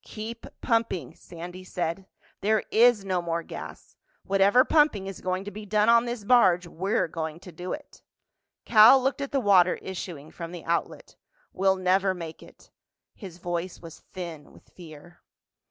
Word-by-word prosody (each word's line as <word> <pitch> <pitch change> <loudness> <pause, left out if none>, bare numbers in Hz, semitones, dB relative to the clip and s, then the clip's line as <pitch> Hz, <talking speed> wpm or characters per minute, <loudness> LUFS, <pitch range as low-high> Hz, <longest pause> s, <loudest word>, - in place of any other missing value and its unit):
"Keep 225 +2 -8
pumping," 225 - -1
Sandy 175 +2 -10
said. 180 +1 -4 0.3
"There 215 +1 +1
is 230 -3 +4
no 185 -2 0
more 170 -1 -3
gas. - - -10 0.3
Whatever 200 +6 +4
pumping 295 -11 +2
is 195 -1 -8
going 185 +1 -2
to 205 - -7
be 215 +1 -9
done 210 +2 +2
on 235 0 +5
this 240 -2 -5
barge—we're 185 -5 +2
going 160 0 -5
to 180 - -11
do 175 +2 -7
it." 295 -1 -8 0.6
Cal 230 +4 +8
looked 270 +2 -1
at 280 - -4
the 275 - +1
water 190 -6 +4
issuing 170 -5 -8
from 170 0 -8
the 175 - -9
outlet. 170 +1 -3 0.4
"We'll 190 0 +2
never 185 +1 +1
make 165 -2 -8
it." - - -18 0.4
His 185 -5 -11
voice 175 0 -4
was 165 -2 -12
thin 170 -5 -9
with - - -20
fear. 170 0 -14
185 Hz, 160 wpm, -26 LUFS, 175-215 Hz, 0.6 s, Cal